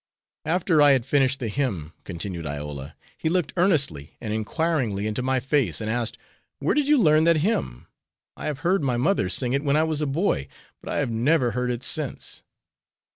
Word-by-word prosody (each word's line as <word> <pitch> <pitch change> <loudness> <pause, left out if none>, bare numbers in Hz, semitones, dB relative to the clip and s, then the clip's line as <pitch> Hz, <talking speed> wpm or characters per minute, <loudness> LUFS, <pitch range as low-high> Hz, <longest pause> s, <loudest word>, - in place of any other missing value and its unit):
"After 165 -1 +2
I 145 -1 +7
had 130 -3 +1
finished 135 -1 +2
the 120 - -3
hymn," 105 - -2
continued 85 -2 -5
Iola, 70 -1 -6 0.2
"he 160 - 0
looked 175 -2 0
earnestly 145 - +1
and 110 -2 -4
inquiringly 110 -2 -1
into 110 +3 -2
my 130 +1 +1
face, 135 0 0
and 110 -1 -2
asked, 120 -1 -2 0.4
'Where - - 0
did 295 -2 +1
you 300 0 +5
learn 155 - +5
that 170 -1 +5
hymn? 65 - -1 0.5
I - - -5
have 145 -2 -3
heard 185 +2 +2
my 130 -4 0
mother 125 - +1
sing 120 +6 0
it 140 +1 0
when 145 0 +2
I 155 - +4
was 155 -2 -1
a 150 - 0
boy, 135 - 0 0.3
but - - -7
I - - -1
have 140 -5 0
never 125 +2 +2
heard 125 +2 -1
it 120 0 -3
since.' 150 -2 -1
130 Hz, 195 wpm, -24 LUFS, 110-155 Hz, 0.5 s, I